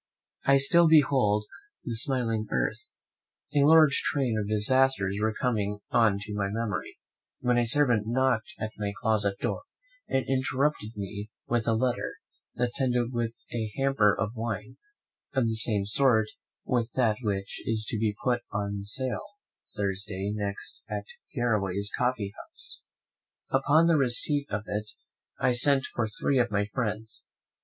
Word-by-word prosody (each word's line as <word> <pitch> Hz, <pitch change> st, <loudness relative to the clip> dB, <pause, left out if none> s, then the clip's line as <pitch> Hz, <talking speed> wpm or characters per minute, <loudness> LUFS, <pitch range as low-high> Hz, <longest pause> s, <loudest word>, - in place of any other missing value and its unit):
I 135 Hz, 0 st, +6 dB
still 165 Hz, +5 st, +5 dB
behold 130 Hz, -9 st, +4 dB, 0.4 s
the 125 Hz, -7 st, -4 dB
smiling 115 Hz, -3 st, 0 dB
earth 65 Hz, -2 st, -2 dB, 0.6 s
A 145 Hz, -, +4 dB
large 155 Hz, -1 st, +6 dB
train 130 Hz, -6 st, 0 dB
of 105 Hz, -1 st, -3 dB
disasters 105 Hz, -2 st, +2 dB
were 110 Hz, 0 st, +2 dB
coming 105 Hz, -5 st, 0 dB
on 110 Hz, -4 st, +4 dB
to 105 Hz, +1 st, -6 dB
my 100 Hz, -1 st, -1 dB
memory, 110 Hz, -2 st, -3 dB, 0.4 s
when 125 Hz, -1 st, +2 dB
my 120 Hz, -, +3 dB
servant 120 Hz, -4 st, +2 dB
knocked 130 Hz, -, 0 dB
at 110 Hz, -8 st, -4 dB
my 100 Hz, -1 st, -2 dB
closet 105 Hz, -3 st, +1 dB
door, -, -, -2 dB, 0.5 s
and 135 Hz, -, 0 dB
interrupted 135 Hz, -3 st, 0 dB
me 100 Hz, +1 st, -5 dB, 0.2 s
with 120 Hz, -2 st, 0 dB
a 115 Hz, -, +3 dB
letter, 125 Hz, +2 st, -1 dB, 0.4 s
attended 125 Hz, 0 st, 0 dB
with 115 Hz, -1 st, -2 dB, 0.2 s
a 110 Hz, -2 st, -2 dB
hamper 135 Hz, -7 st, +3 dB
of 105 Hz, -2 st, -1 dB
wine, 110 Hz, -3 st, -4 dB, 0.6 s
of 130 Hz, -3 st, +3 dB
the 115 Hz, -, 0 dB
same 110 Hz, -2 st, +2 dB
sort 110 Hz, 0 st, +3 dB, 0.4 s
with 120 Hz, -2 st, 0 dB
that 115 Hz, -5 st, +2 dB
which 100 Hz, -3 st, -3 dB
is 110 Hz, -1 st, 0 dB
to 110 Hz, -, -1 dB
be 105 Hz, -2 st, 0 dB
put 120 Hz, -1 st, +1 dB
to 100 Hz, 0 st, -2 dB
sale 125 Hz, +6 st, -2 dB
on 205 Hz, 0 st, -30 dB
Thursday 100 Hz, 0 st, -2 dB
next 100 Hz, -1 st, -5 dB
at -, -, -4 dB, 0.3 s
Garraway's 105 Hz, -5 st, 0 dB
coffee 120 Hz, -6 st, -1 dB
house. -, -, -3 dB, 0.7 s
Upon 145 Hz, +5 st, +4 dB
the 165 Hz, -2 st, +4 dB
receipt 140 Hz, +2 st, +2 dB
of 105 Hz, 0 st, -2 dB
it 105 Hz, +1 st, -3 dB, 0.5 s
I -, -, +3 dB
sent 135 Hz, +2 st, +3 dB
for 120 Hz, -2 st, 0 dB
three 130 Hz, +5 st, 0 dB
of 120 Hz, -, +2 dB
my 100 Hz, 0 st, 0 dB
friends. 110 Hz, -1 st, -4 dB
115 Hz, 150 wpm, -28 LUFS, 105-130 Hz, 0.7 s, I